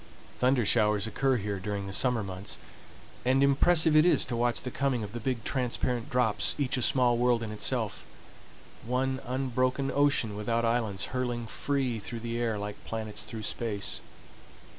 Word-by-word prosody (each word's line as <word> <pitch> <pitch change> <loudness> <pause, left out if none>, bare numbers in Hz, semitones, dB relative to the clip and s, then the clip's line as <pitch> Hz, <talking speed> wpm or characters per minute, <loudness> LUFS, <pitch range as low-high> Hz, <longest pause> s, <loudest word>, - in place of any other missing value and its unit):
Thunder 125 -2 +3
showers 105 -1 +3
occur 130 +4 +1
here 100 -2 -3
during 100 +1 -3
the 95 - -6
summer 125 0 +3
months, 95 +1 -6 0.7
and 130 +2 +3
impressive 155 +3 +4
it 155 - +7
is 175 - +4
to 120 - -3
watch 120 0 0
the 125 - -4
coming 135 -4 0
of 100 - -6
the 120 - -4
big 120 -1 -2
transparent 125 -2 -1
drops, 120 -4 +2
each 140 -2 0
a 130 - -1
small 120 -1 +3
world 120 -1 +2
in 110 - -5
itself,—one 130 +4 -4
unbroken 130 +1 0
ocean 140 -7 +2
without 115 +3 0
islands 115 -4 0
hurling 120 -2 -2
free 130 -1 -1
through 115 +3 -6
the 115 0 -3
air 115 -3 0
like 105 0 -6
planets 110 -1 -4
through 110 -1 -7
space. 105 -2 -3
120 Hz, 160 wpm, -29 LUFS, 110-130 Hz, 0.7 s, it